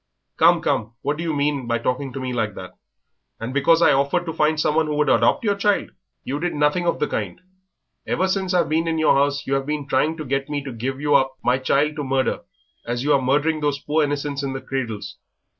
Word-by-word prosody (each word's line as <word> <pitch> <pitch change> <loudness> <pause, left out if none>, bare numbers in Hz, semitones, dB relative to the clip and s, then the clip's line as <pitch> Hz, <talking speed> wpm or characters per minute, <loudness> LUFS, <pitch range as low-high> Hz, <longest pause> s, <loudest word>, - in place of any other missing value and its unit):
"Come, - - +5
come.... 110 +1 -1
What 145 +1 -1
do 165 - -4
you 165 - -1
mean 140 -3 -1
by 115 0 +1
talking 125 +3 -2
to 135 - -6
me 130 -1 -3
like 110 -4 -2
that? 90 - -8 0.7
And 115 +3 -5
because 165 +4 +4
I - - +6
offered 140 +6 +1
to 165 - -4
find 155 0 +1
someone 155 +1 +2
who 150 - -2
would 150 0 +2
adopt - - +3
your 205 -2 +2
child." 200 0 0 0.3
"You 140 +3 -3
did 175 0 -2
nothing 150 +4 +1
of 170 - +1
the - - 0
kind; - - -4 0.7
ever 190 - +1
since 190 -1 -1
I've 175 - +3
been 160 +2 0
in 165 -1 0
your 155 - +4
house 140 +1 +1
you 135 - -2
have 135 0 -1
been 150 -2 -3
trying 150 +5 +1
to 155 - -6
get 135 +1 -2
me 145 -1 -2
to 135 - -6
give 130 +3 -4
you 145 0 +1
up 135 -1 +3
my 125 +2 +2
child 145 +4 +1
to 145 - -2
murder 135 -1 0 0.4
as 120 +1 -3
you 150 - +3
are 135 - +3
murdering 150 +5 +1
those 145 -1 0
poor 150 +2 0
innocents 145 -1 -2
in 135 -1 -3
the 135 - -5
cradles." 125 -6 -5
145 Hz, 240 wpm, -22 LUFS, 135-155 Hz, 0.7 s, I